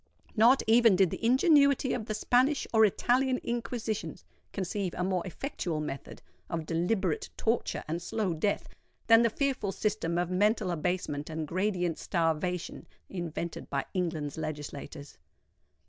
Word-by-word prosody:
Not 240 Hz, +4 st, +5 dB
even 225 Hz, -2 st, +6 dB
did 185 Hz, -2 st, +3 dB
the -, -, -6 dB
ingenuity 280 Hz, +1 st, +4 dB
of 220 Hz, -2 st, -3 dB
the 215 Hz, -, -2 dB
Spanish 255 Hz, +6 st, +2 dB
or 220 Hz, -1 st, +6 dB
Italian 255 Hz, +5 st, +2 dB
Inquisitions 230 Hz, -2 st, -3 dB, 0.3 s
conceive 190 Hz, -1 st, -3 dB
a 180 Hz, -, 0 dB
more 185 Hz, -1 st, 0 dB
effectual 180 Hz, -, -4 dB
method 150 Hz, -2 st, -6 dB, 0.3 s
of 165 Hz, -1 st, -3 dB
deliberate 190 Hz, -, -1 dB
torture 225 Hz, +1 st, -1 dB
and 165 Hz, +3 st, -3 dB
slow 205 Hz, -1 st, -1 dB
death, 200 Hz, +6 st, -1 dB, 0.4 s
than 225 Hz, 0 st, +7 dB
the 230 Hz, -, +4 dB
fearful 260 Hz, -4 st, -1 dB
system 195 Hz, -5 st, -1 dB
of 175 Hz, 0 st, -1 dB
mental 205 Hz, 0 st, +2 dB
abasement 165 Hz, -3 st, -2 dB
and 160 Hz, -1 st, -4 dB
gradient 180 Hz, -1 st, -1 dB
starvation 170 Hz, 0 st, -1 dB, 0.2 s
invented 170 Hz, -2 st, -5 dB
by 140 Hz, -1 st, -1 dB
England's 160 Hz, -5 st, -2 dB
legislators. 150 Hz, -1 st, -7 dB
190 Hz, 135 wpm, -29 LUFS, 165-230 Hz, 0.4 s, than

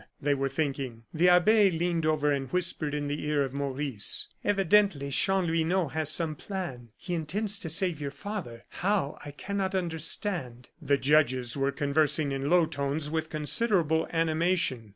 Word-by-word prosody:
they 145 Hz, +1 st, +1 dB
were 135 Hz, 0 st, -1 dB
thinking. 135 Hz, -5 st, -3 dB
The 175 Hz, +3 st, +4 dB
abbe 200 Hz, +4 st, +5 dB
leaned 170 Hz, -1 st, -1 dB
over 150 Hz, -1 st, +2 dB
and 135 Hz, -2 st, -2 dB
whispered 170 Hz, -4 st, 0 dB
in 145 Hz, -1 st, -2 dB
the 145 Hz, +1 st, -3 dB
ear 150 Hz, -1 st, +2 dB
of 135 Hz, -1 st, -5 dB
Maurice: 140 Hz, -5 st, -1 dB
"Evidently 195 Hz, -7 st, +2 dB
Chanlouineau 175 Hz, -1 st, +1 dB
has 155 Hz, +1 st, 0 dB
some 160 Hz, 0 st, +2 dB
plan. 150 Hz, -, -6 dB
He 180 Hz, -, -6 dB
intends 195 Hz, +6 st, -1 dB
to 165 Hz, -, -4 dB
save 165 Hz, -1 st, +1 dB
your 140 Hz, -, -2 dB
father. 150 Hz, -, -7 dB
How, 190 Hz, -6 st, -1 dB
I 145 Hz, -, -7 dB
cannot 195 Hz, +6 st, -3 dB
understand." 160 Hz, -, -2 dB
The 140 Hz, -, +2 dB
judges 130 Hz, -3 st, +2 dB
were 140 Hz, 0 st, 0 dB
conversing 145 Hz, +1 st, +1 dB
in 135 Hz, +1 st, -2 dB
low 175 Hz, -1 st, +5 dB
tones 145 Hz, 0 st, -3 dB
with 160 Hz, -1 st, -2 dB
considerable 160 Hz, -, +1 dB
animation. 165 Hz, -, 0 dB
155 Hz, 155 wpm, -28 LUFS, 140-180 Hz, -, abbe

